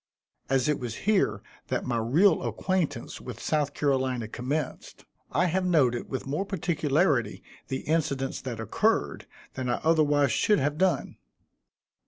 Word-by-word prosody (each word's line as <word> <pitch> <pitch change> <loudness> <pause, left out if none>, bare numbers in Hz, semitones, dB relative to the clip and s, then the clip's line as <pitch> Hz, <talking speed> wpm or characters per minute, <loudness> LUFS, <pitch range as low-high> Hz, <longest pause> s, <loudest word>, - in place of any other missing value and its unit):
As 135 0 +2
it 150 - +1
was 120 -4 -4
here 185 - +2 0.2
that - - -2
my 120 -2 0
real 155 - +4
acquaintance 185 -4 -2
with - - -8
South 150 -2 -1
Carolina 130 -5 0
commenced, 135 +6 -4 0.3
I 180 - +2
have 185 +2 0
noted 140 -10 +2
with 130 - -4
more 145 +7 -1
particularity 155 - 0 0.2
the 130 - -3
incidents 145 -4 -1
that 120 -4 -5
occurred, 110 - 0 0.3
than 130 -1 -3
I 120 - +2
otherwise 150 -4 +3
should 210 - +3
have 145 +2 -1
done. 185 -6 +1
145 Hz, 140 wpm, -27 LUFS, 130-165 Hz, 0.3 s, real